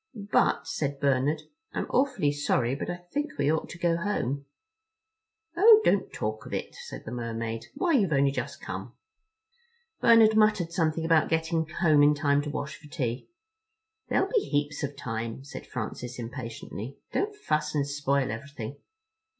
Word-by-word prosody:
"But," -, -, +3 dB
said 140 Hz, -2 st, -2 dB
Bernard, 140 Hz, +3 st, +1 dB, 0.3 s
"I'm -, -, -1 dB
awfully 265 Hz, -, +2 dB
sorry, 130 Hz, -4 st, +1 dB
but 140 Hz, -, -4 dB
I 175 Hz, 0 st, -5 dB
think 295 Hz, +1 st, -1 dB
we 145 Hz, +1 st, +2 dB
ought 160 Hz, -, -2 dB
to -, -, -8 dB
go 170 Hz, -1 st, +1 dB
home." 140 Hz, -7 st, -2 dB, 1.1 s
"Oh, 425 Hz, +5 st, +8 dB
don't 200 Hz, -, +2 dB
talk 110 Hz, 0 st, -4 dB
of -, -, -8 dB
it," -, -, -4 dB
said -, -, -9 dB
the 110 Hz, -, -6 dB
Mermaid. 115 Hz, -1 st, -4 dB
"Why, 360 Hz, -2 st, +1 dB
you've 210 Hz, -, +3 dB
only 140 Hz, -1 st, +3 dB
just 140 Hz, -, -4 dB
come." -, -, -6 dB, 1.1 s
Bernard 225 Hz, -2 st, +6 dB
muttered 210 Hz, -6 st, +3 dB
something 165 Hz, -2 st, 0 dB
about 165 Hz, -2 st, +4 dB
getting 160 Hz, 0 st, 0 dB
home 155 Hz, -3 st, +4 dB
in 145 Hz, +1 st, +6 dB
time 140 Hz, 0 st, +2 dB
to 150 Hz, -, -5 dB
wash 145 Hz, +1 st, -4 dB
for 150 Hz, -, -15 dB
tea. 130 Hz, -6 st, -3 dB, 0.8 s
"There'll -, -, +2 dB
be 475 Hz, -, +4 dB
heaps 145 Hz, -, -1 dB
of 140 Hz, 0 st, -4 dB
time," 115 Hz, 0 st, -4 dB
said 140 Hz, -, -9 dB
Francis 125 Hz, 0 st, -5 dB
impatiently; 115 Hz, 0 st, -6 dB
"don't 415 Hz, +1 st, -1 dB
fuss 150 Hz, -, -1 dB
and 145 Hz, -2 st, +2 dB
spoil 140 Hz, -3 st, 0 dB
everything." 135 Hz, +1 st, -7 dB
145 Hz, 160 wpm, -28 LUFS, 135-170 Hz, 1.1 s, Oh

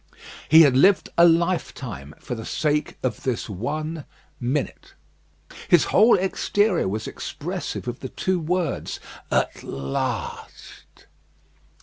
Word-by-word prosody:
He 160 Hz, +2 st, +9 dB
had 140 Hz, -4 st, +4 dB
lived 185 Hz, +9 st, +4 dB
a 170 Hz, 0 st, +7 dB
lifetime 165 Hz, -, -1 dB
for -, -, -6 dB
the 115 Hz, -2 st, -6 dB
sake 150 Hz, +4 st, -1 dB
of 130 Hz, -, -2 dB
this 130 Hz, -1 st, -2 dB
one 150 Hz, -, -4 dB, 0.3 s
minute. 135 Hz, +4 st, -3 dB, 0.7 s
His 175 Hz, -, +5 dB
whole 220 Hz, +2 st, +6 dB
exterior 190 Hz, -, +1 dB
was 105 Hz, +3 st, -3 dB
expressive -, -, -5 dB
of 120 Hz, 0 st, -4 dB
the 130 Hz, -, -6 dB
two 185 Hz, +6 st, -1 dB
words, 170 Hz, -1 st, -2 dB, 0.3 s
"At -, -, 0 dB
last." 70 Hz, 0 st, -5 dB
150 Hz, 115 wpm, -23 LUFS, 120-175 Hz, 0.7 s, He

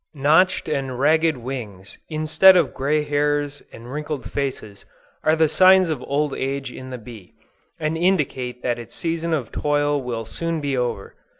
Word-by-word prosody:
Notched 155 Hz, +7 st, +3 dB
and 135 Hz, -2 st, -2 dB
ragged 160 Hz, +1 st, +3 dB
wings, 115 Hz, -7 st, -7 dB
instead 155 Hz, +4 st, +5 dB
of 165 Hz, -5 st, +1 dB
gray 150 Hz, +3 st, 0 dB
hairs 145 Hz, 0 st, -1 dB
and 120 Hz, +2 st, -11 dB
wrinkled 150 Hz, -1 st, -4 dB
faces, 130 Hz, -8 st, -4 dB, 0.4 s
are 155 Hz, -, +3 dB
the 160 Hz, 0 st, +3 dB
signs 185 Hz, +2 st, +5 dB
of 155 Hz, -, -3 dB
old 145 Hz, 0 st, 0 dB
age 135 Hz, -1 st, -3 dB
in 130 Hz, +1 st, -9 dB
the 125 Hz, -, -6 dB
bee, 110 Hz, -5 st, -12 dB, 0.5 s
and 155 Hz, 0 st, -1 dB
indicate 140 Hz, -8 st, -1 dB
that 120 Hz, -1 st, -1 dB
its 120 Hz, -, -10 dB
season 165 Hz, 0 st, -2 dB
of 140 Hz, -8 st, -2 dB
toil 145 Hz, -1 st, 0 dB
will 120 Hz, -3 st, -4 dB
soon 165 Hz, +8 st, -3 dB
be 140 Hz, -2 st, -2 dB
over. 120 Hz, -5 st, -3 dB
145 Hz, 165 wpm, -22 LUFS, 125-155 Hz, 0.5 s, instead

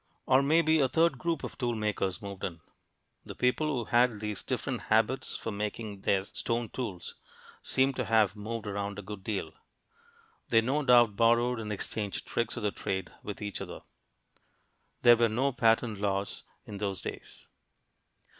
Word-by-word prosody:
Or 130 Hz, +1 st, +5 dB
maybe 160 Hz, +2 st, +4 dB
a 135 Hz, -2 st, +3 dB
third 160 Hz, -2 st, +2 dB
group 165 Hz, +2 st, -1 dB
of -, -, -7 dB
tool 120 Hz, -2 st, 0 dB
makers 105 Hz, -2 st, -2 dB
moved 100 Hz, -1 st, -7 dB
in. 85 Hz, -3 st, -4 dB, 0.6 s
The -, -, -9 dB
people 125 Hz, +5 st, +1 dB
who 130 Hz, -6 st, -1 dB
had 120 Hz, -2 st, +3 dB
these 105 Hz, -1 st, -4 dB
different -, -, -3 dB
habits -, -, +2 dB
for 115 Hz, -, -4 dB
making 105 Hz, 0 st, -4 dB
their 95 Hz, -1 st, +2 dB
stone 115 Hz, +3 st, -3 dB
tools 100 Hz, -9 st, -5 dB, 0.5 s
seem 135 Hz, +1 st, +2 dB
to 125 Hz, -2 st, -2 dB
have 110 Hz, -3 st, +3 dB
moved 110 Hz, +2 st, -5 dB
around 100 Hz, 0 st, -3 dB
a 105 Hz, -, -6 dB
good 100 Hz, 0 st, -8 dB
deal. 105 Hz, -2 st, -3 dB, 1.0 s
They 115 Hz, -1 st, +5 dB
no 135 Hz, +6 st, 0 dB
doubt 120 Hz, -5 st, +5 dB
borrowed 120 Hz, +2 st, +3 dB
and 105 Hz, -1 st, -5 dB
exchanged 100 Hz, 0 st, -3 dB
tricks 120 Hz, -1 st, -2 dB
of 120 Hz, -, -4 dB
the 105 Hz, -, +1 dB
trade 95 Hz, -2 st, -3 dB
with 105 Hz, 0 st, -6 dB
each 100 Hz, -1 st, -4 dB
other. -, -, -7 dB, 1.2 s
There 120 Hz, -1 st, +8 dB
were 115 Hz, 0 st, +3 dB
no 130 Hz, +6 st, +1 dB
patent 115 Hz, -3 st, +2 dB
laws 100 Hz, -1 st, -2 dB, 0.2 s
in 100 Hz, -2 st, -7 dB
those 100 Hz, -3 st, -3 dB
days. -, -, -8 dB
110 Hz, 165 wpm, -30 LUFS, 100-125 Hz, 1.2 s, There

